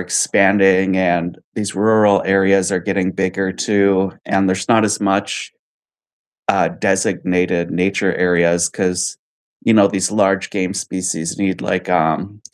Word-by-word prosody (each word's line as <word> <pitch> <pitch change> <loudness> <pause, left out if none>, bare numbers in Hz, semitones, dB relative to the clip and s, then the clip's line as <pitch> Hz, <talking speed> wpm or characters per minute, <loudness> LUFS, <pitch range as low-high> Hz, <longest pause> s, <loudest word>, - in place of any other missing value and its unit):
expanding, 95 -1 +2
and 90 -1 -1 0.2
these 105 -2 -4
rural 105 0 +3
areas 95 0 +2
are 90 - -1
getting 95 +2 -2
bigger 95 0 -2
too, 100 -3 +1
and 95 0 +1
there's 95 0 -2
not 115 -2 +4
as 110 0 -1
much, 100 0 -2 1.0
uh, - - +2
designated 90 -1 -1
nature 95 +2 0
areas 85 -1 +2
'cause, 90 +1 -2 0.5
you 115 - +3
know, 105 -3 +6
these 95 -1 -1
large 95 -2 +1
game 95 -1 -3
species 90 -4 -4
need, 95 -2 -1
like, 90 0 -3
um, 90 +4 -1
95 Hz, 135 wpm, -17 LUFS, 90-100 Hz, 1.0 s, know